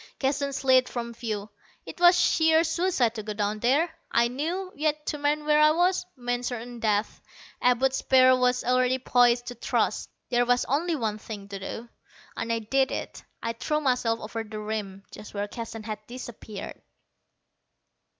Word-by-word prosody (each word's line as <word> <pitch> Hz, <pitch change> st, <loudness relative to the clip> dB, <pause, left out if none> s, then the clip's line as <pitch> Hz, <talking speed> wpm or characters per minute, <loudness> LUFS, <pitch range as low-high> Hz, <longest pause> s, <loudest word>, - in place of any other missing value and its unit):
Keston 280 Hz, +1 st, 0 dB
slid 260 Hz, -1 st, +3 dB
from 235 Hz, -1 st, -5 dB
view. 215 Hz, -3 st, -5 dB, 0.3 s
It -, -, -10 dB
was 350 Hz, 0 st, +6 dB
sheer 320 Hz, 0 st, +4 dB
suicide 325 Hz, -8 st, +1 dB
to 225 Hz, -, -5 dB
go 210 Hz, 0 st, -5 dB
down 210 Hz, 0 st, -2 dB
there, 290 Hz, +9 st, +2 dB, 0.2 s
I 235 Hz, 0 st, +3 dB
knew; 340 Hz, +9 st, -3 dB
yet, 300 Hz, 0 st, -1 dB
to 300 Hz, -, -2 dB
remain 295 Hz, +1 st, 0 dB
where 300 Hz, 0 st, +4 dB
I 305 Hz, -, +7 dB
was, 360 Hz, +3 st, +2 dB
meant 245 Hz, -1 st, -2 dB
certain 240 Hz, 0 st, -6 dB
death. 215 Hz, -1 st, 0 dB, 0.4 s
Abud's 260 Hz, +2 st, +3 dB
spear 255 Hz, -1 st, +5 dB
was 250 Hz, 0 st, +1 dB
already 255 Hz, +1 st, +2 dB
poised 245 Hz, -1 st, +3 dB
to 245 Hz, -, -5 dB
thrust. 240 Hz, -, -1 dB, 0.2 s
There 245 Hz, 0 st, +3 dB
was 245 Hz, 0 st, +3 dB
only 320 Hz, +5 st, 0 dB
one 220 Hz, -6 st, -2 dB
thing 205 Hz, -2 st, -8 dB
to 200 Hz, -1 st, -6 dB
do, 225 Hz, +4 st, -6 dB, 0.5 s
and 230 Hz, -, -3 dB
I 230 Hz, -, +1 dB
did 265 Hz, +5 st, +1 dB
it. -, -, -5 dB, 0.2 s
I 230 Hz, -, -1 dB
threw 300 Hz, +6 st, -1 dB
myself 250 Hz, -5 st, +1 dB
over 225 Hz, +1 st, -4 dB
the 215 Hz, 0 st, -8 dB
rim, 210 Hz, -2 st, -5 dB
just 210 Hz, -, -11 dB
where 205 Hz, 0 st, -2 dB
Keston 225 Hz, 0 st, -7 dB
had 215 Hz, -1 st, -5 dB
disappeared. 235 Hz, -4 st, -8 dB
245 Hz, 170 wpm, -26 LUFS, 225-285 Hz, 0.5 s, I